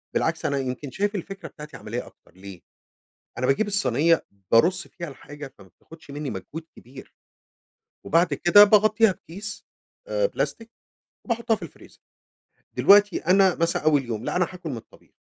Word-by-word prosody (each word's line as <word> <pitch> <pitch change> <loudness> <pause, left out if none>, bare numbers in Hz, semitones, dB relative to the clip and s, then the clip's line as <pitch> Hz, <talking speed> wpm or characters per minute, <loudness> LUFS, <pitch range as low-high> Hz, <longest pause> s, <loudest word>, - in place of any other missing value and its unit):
بالعكس - - -1
أنا 140 - 0
يمكن 130 +1 -5
شايف 205 +2 -1
الفكرة 195 +1 -6
بتاعتي 150 0 -11
عملية 120 +3 -5
أكتر، - - -21
ليه 95 -1 -11 0.8
أنا 125 - -1
باجيب 170 +11 +2
الصينية 165 - +2 0.3
بارُصّ 180 +11 +3
فيها 170 -2 -8
الحاجة 145 0 -10
فما 100 -2 -16
بتاخدش 160 - -16
مني 145 0 -5
مجهود 160 +4 -7
كبير. 130 +2 -14 0.9
وبعد 170 +3 +2
كده 205 +4 +7
باغطيها 215 0 +4
بكيس 195 +4 -9 0.4
آآ، - - +1
بلاستيك 230 - -4 0.6
وباحُطّها 235 -1 0
في - - -18
الفريزر. - - -12 0.8
دلوقتي 205 -1 +5
أنا 190 -1 +5
مثلًا 170 -2 -1
أول 145 -4 +3
يوم 115 -1 -4
لأ، - - -2
أنا 180 -1 +2
هاكُل 175 -3 -8
من 125 - -4
الطبيخ، - - -16
165 Hz, 155 wpm, -24 LUFS, 135-200 Hz, 0.9 s, كده